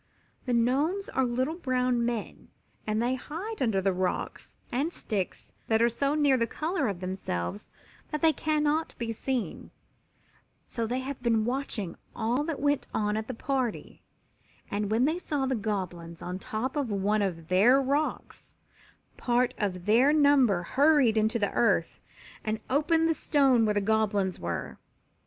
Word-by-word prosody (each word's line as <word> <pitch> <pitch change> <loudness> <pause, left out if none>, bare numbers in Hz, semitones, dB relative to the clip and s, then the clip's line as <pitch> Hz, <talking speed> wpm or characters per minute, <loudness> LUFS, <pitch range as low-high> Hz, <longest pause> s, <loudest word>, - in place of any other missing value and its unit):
The 250 - +1
Gnomes 280 +12 +1
are 265 - +1
little 255 +5 -1
brown 250 -5 0
men 235 -2 -4 0.4
and 215 0 0
they 240 +2 +1
hide 335 - -6
under 210 -7 +1
the 195 - +3
leaves 185 0 -3
and 280 +7 0
sticks 205 - -4
that 220 -1 +3
are 235 +1 +4
so 275 +5 0
near 290 -3 +4
the 230 -1 +1
color 315 -1 -1
of 190 -3 -4
themselves 185 - -4 0.4
that 300 +1 -4
they 320 -1 +6
cannot 305 0 0
be 230 -1 -3
seen, 245 +1 -3 1.0
so 230 -2 -3
they 250 +3 -1
had 270 0 -6
been 225 -3 +2
watching 240 -7 -2 0.2
all 240 +5 0
that 320 -3 -3
went 285 0 +1
on 210 0 0
at 220 0 -3
the 255 - -5
party, 260 -2 -3 0.7
and, 205 0 -1
when 225 +4 +3
they 320 +4 0
saw 290 -6 -1
the 265 - 0
Goblins 180 -6 -4
on 180 +1 -4
top 245 +6 -3
of 285 -5 -1
one 205 +1 +1
of 170 -5 -3
their 210 +10 +5
rocks, 280 +3 -2 0.6
part 245 +1 +1
of 185 -4 -2
their 240 +7 +5
number 280 -11 +4
hurried 275 - +4
into 220 +2 +2
the 205 -3 0
earth 235 - +1 0.4
and 215 0 -2
opened 320 +4 +3
the 325 - +3
stone 270 -7 +3
where 210 -1 +1
the 205 - +2
Goblins 205 -3 +1
were. 85 0 -4
240 Hz, 160 wpm, -28 LUFS, 210-280 Hz, 1.0 s, they